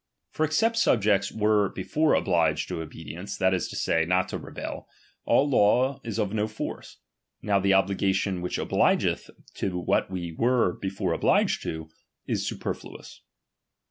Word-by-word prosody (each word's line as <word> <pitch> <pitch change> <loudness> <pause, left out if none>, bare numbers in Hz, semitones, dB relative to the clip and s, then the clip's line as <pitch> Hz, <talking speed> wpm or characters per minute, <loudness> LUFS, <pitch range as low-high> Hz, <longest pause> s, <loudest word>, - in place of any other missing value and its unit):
For 155 - -1
ex 155 +9 +1
es 225 - +4
^pt - - -10
subjects 105 - +2
were 105 -2 +2
before 150 +11 +1
obliged 85 -4 +1
to 80 - -3
obedience, 80 +5 -7
t"fciat 95 0 +2
is 95 - -1
to - - -8
say, 80 - +1
not 90 +3 +1
to - - -4
rebel, - - -7 0.4
all 145 - +3
law 130 +2 +3
is 115 -2 -4
of 105 -2 -1
no 105 0 0
force. 110 0 -7 0.5
t*^ow 100 -2 +2
the 95 0 +3
obligation 95 -1 +1
which 90 - -3
obligeth - - +1 0.3
to 90 -2 -2
what 90 - 0
we 85 -3 -5
vx?^ere 120 -5 +1
before 95 -2 -2
obliged - - +2
to, 80 0 -6 0.3
is - - -2
superfluous. - - -6
100 Hz, 160 wpm, -26 LUFS, 90-110 Hz, 0.5 s, es